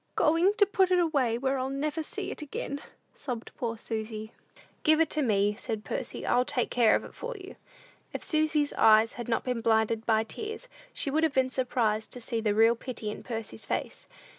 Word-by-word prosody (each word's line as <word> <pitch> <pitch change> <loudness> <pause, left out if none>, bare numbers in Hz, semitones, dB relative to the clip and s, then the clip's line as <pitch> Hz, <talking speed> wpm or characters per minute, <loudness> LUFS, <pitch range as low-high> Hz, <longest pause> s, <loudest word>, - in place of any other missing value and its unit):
"Going 335 +6 +4
to 410 - +6
put 385 -2 +2
it 365 - +4
away, 280 -9 +2
where 265 +2 0
I'll 260 +1 -2
never 300 +3 -2
see 390 +5 -5
it - - -7
again," 285 -1 -5 0.3
sobbed 250 - -6
poor 230 -2 -3
Susy. 220 -1 -5 0.5
"Give 310 0 +4
it 325 -2 +2
to 305 - +1
me," 205 -5 +2
said 215 -1 -5
Percy: - - -3
"I'll 250 - +3
take 255 -2 -1
care 235 -3 +5
of - - -1
it - - -11
for 485 0 -6
you." 380 0 -10 0.6
If - - -5
Susy's 310 -2 +1
eyes 220 0 +6
had 240 -1 -6
not 230 - +1
been 250 -2 -2
blinded 220 0 +1
by 220 -1 +3
tears, 440 - -6 0.2
she 280 - -2
would 310 +3 +2
have 320 -3 +2
been 260 -1 +2
surprised 235 -5 0
to 250 - -5
see 230 -1 -2
the 210 -2 +1
real 225 +2 +5
pity 230 -3 -5
in - - -8
Percy's 225 - -6
face. - - -3
250 Hz, 205 wpm, -29 LUFS, 225-310 Hz, 0.6 s, to